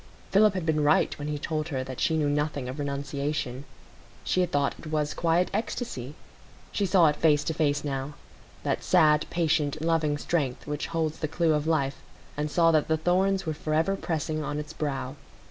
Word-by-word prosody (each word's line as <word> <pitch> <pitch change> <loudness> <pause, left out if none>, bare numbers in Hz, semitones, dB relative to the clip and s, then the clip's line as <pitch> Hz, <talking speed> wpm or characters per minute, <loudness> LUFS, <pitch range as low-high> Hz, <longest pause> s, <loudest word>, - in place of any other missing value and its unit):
Philip 205 0 +5
had 180 -3 -2
been 155 -2 +1
right 150 +1 +3
when 145 - -4
he 150 -1 -2
told 155 +1 -2
her 130 -4 -2
that 130 -1 -7
she 160 - +2
knew 150 -2 +1
nothing 145 -2 -1
of 130 +4 -6
renunciation; 140 -1 -3 0.6
she 185 - +1
had 180 - 0
thought 140 -1 +1
it - - -10
was 150 -1 -1
quiet 170 +2 +1
ecstasy; 195 - -3 0.6
she 200 - 0
saw 180 -2 +5
it 150 -1 +3
face 150 -2 +3
to 160 - -1
face 145 -2 +1
now,—that 140 0 -5
sad, 155 -4 +4
patient, 155 -3 +1
loving 160 -2 +1
strength 140 -5 -2
which 150 0 -3
holds 160 -2 -2
the 155 - -1
clue 160 +1 +1
of 150 +1 0
life,—and 150 0 -3
saw 165 +1 +4
that 155 -2 +2
the 160 - +2
thorns 190 +4 +1
were 160 - -1
forever 155 +5 0
pressing 155 -3 -2
on 145 0 -3
its 150 +1 -6
brow. 135 -3 -3
155 Hz, 185 wpm, -27 LUFS, 145-165 Hz, 0.6 s, Philip